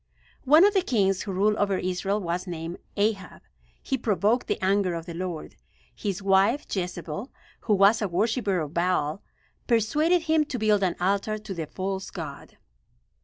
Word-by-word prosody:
One 305 +7 +7
of 410 - +4
the 385 - +3
kings 195 - +1
who 200 - -4
ruled 205 +3 +2
over 200 -2 +1
Israel 185 +3 -1
was 180 0 -3
named 170 0 -5 0.2
Ahab. 200 -2 -1 0.4
He 265 - -1
provoked 215 +2 +1
the - - -1
anger 190 -2 +1
of 165 -1 -5
the 170 - -7
Lord. 175 -2 -5 0.4
His 200 -2 -4
wife, 195 +8 +3
Jezebel, 180 - -4 0.3
who 215 - +1
was 200 +3 +5
a 205 - +1
worshiper 200 0 0
of 150 0 -5
Baal, 170 -1 0 0.5
persuaded 300 +10 +2
him 315 -1 +3
to 265 - -4
build 215 -2 +2
an 180 -3 +1
altar 200 +4 0
to 210 -2 -7
the 165 -4 -5
false 190 +2 -4
god. - - -8
195 Hz, 170 wpm, -26 LUFS, 180-220 Hz, 0.5 s, One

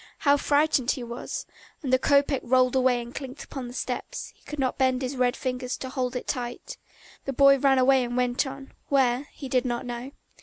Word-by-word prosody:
How 285 -1 +4
frightened 285 -3 +2
he 255 - 0
was. 235 +1 -5 0.4
And 260 -2 -1
the 260 - +5
kopeck 280 0 +3
rolled 255 +1 +3
away 255 -1 +3
and 235 +1 -11
clinked 270 0 -7
upon 265 -3 -7
the 240 - -9
steps; - - -4
he - - -30
could 300 - -7
not 265 -1 -1
bend 260 0 +2
his 260 +2 -3
red 250 0 +2
fingers 250 -1 -3
to 260 - -6
hold 255 -1 -2
it 250 - -3
tight. 245 - -4 0.5
The 275 - -2
boy 275 +1 +6
ran 270 0 +4
away 260 0 +5
and 245 0 -3
went 250 +2 +1
on, 270 0 -9 0.2
where 265 0 +2
he 275 - -8
did 255 -1 +2
not 240 0 -2
know. 240 +1 -5
260 Hz, 215 wpm, -26 LUFS, 250-275 Hz, 0.5 s, boy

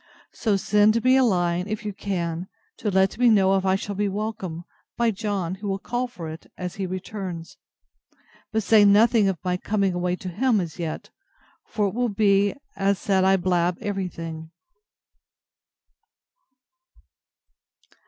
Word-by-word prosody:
So 210 -3 +1
send 210 +3 +3
me 255 +1 +5
a 265 - +5
line, 180 -4 +1
if 215 +1 -4
you 210 - -3
can, 175 -3 -3 0.3
to 215 - -2
let 190 +2 +2
me 245 -1 +5
know 195 -3 +4
if 190 0 0
I 190 0 +3
shall 200 +1 -4
be 205 +1 0
welcome, 195 -5 -4 0.3
by 235 -1 +2
John, 200 -4 -2
who 205 +2 -6
will 195 -1 -1
call 245 +5 -3
for 175 -9 -8
it 160 +1 -10
as 180 -1 -5
he 195 -2 -2
returns. 185 -2 -6 0.9
But 220 -1 0
say 215 0 +6
nothing 210 +1 +5
of 190 - -2
my 180 -1 0
coming 200 -1 0
away 180 0 -1
to 185 0 -7
him, 220 +5 +1
as 170 -2 -5
yet: 160 -2 -5 0.6
for 210 -2 -1
it 190 - -4
will 245 +1 0
be 200 -1 +2 0.4
said 190 -1 +1
I 190 0 +4
blab 175 -1 +1
every 195 -2 -2
thing. 160 -2 -7
195 Hz, 155 wpm, -24 LUFS, 180-210 Hz, 0.9 s, say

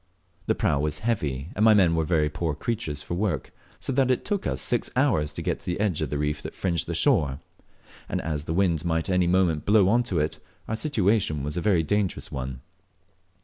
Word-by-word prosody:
The - - +2
prau 70 - +1
was 75 0 0
heavy, 75 - -1
and 105 - +1
my 110 -1 +7
men 90 -5 +4
very 80 -3 +2
poor 75 0 -2
creatures 75 -6 -3
for - - -5
work, 95 +3 -1 0.3
so 135 - -3
that 130 0 +2
it 130 - +1
took 205 -2 -1
us - - -1
six 120 - -1
hours 110 - +2
to - - -5
get - - -1
to - - -10
the 90 +1 -2
edge 100 -6 0
of - - -1
the 75 - -2
reef 75 +1 -1
that - - -8
fringed 85 -6 -1
the - - -2
shore; 70 -2 +2 0.7
and - - -1
as 75 -2 -3
the 80 - -2
wind 85 -5 +2
might 80 0 -1
at - - +1
any 90 -1 +3
moment 90 -4 +2
blow 100 -2 +4
on 120 +4 +4
to 95 -7 -2
it, 75 0 -1 0.3
our 110 - -1
situation 105 - +1
was 75 +3 -3
a 90 - -1
very 90 -4 +3
dangerous 100 +3 -1
one. 65 -1 -5
85 Hz, 225 wpm, -26 LUFS, 75-105 Hz, 0.7 s, my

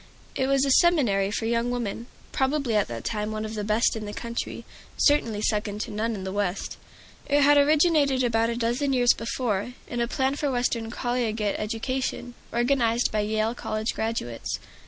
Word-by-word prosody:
It 265 - 0
was 275 0 +3
a 275 - +1
seminary 255 - +4
for 225 +2 -2
young 235 +1 0
women, 235 -1 -3 0.2
probably 265 -3 0
at 210 - +2
that 115 -1 -6
time 210 -1 -2
one 215 0 -3
of 215 - -6
the 210 -1 -3
best 215 +3 +2
in 220 -1 -5
the 205 - -6
country, 235 0 -5 0.3
certainly 230 -8 +2
second 210 -1 -1
to - - -5
none 225 +2 -1
in 190 - -6
the 190 - -4
West. 200 -1 -2 0.5
It 285 0 +3
had 290 +1 +6
originated 290 -2 +4
about 230 -1 +2
a 235 - -2
dozen 245 +4 0
years 245 -2 +5
before, 230 -1 -2
in 240 -1 -3
a 235 - +1
plan 265 +2 0
for 290 - 0
Western 245 -3 -1
collegiate 235 -4 -1
education, 245 +3 -3 0.2
organized 240 -1 +2
by 215 - 0
Yale 215 +2 0
College 215 -2 -3
graduates. 220 - -3
235 Hz, 180 wpm, -26 LUFS, 215-260 Hz, 0.5 s, had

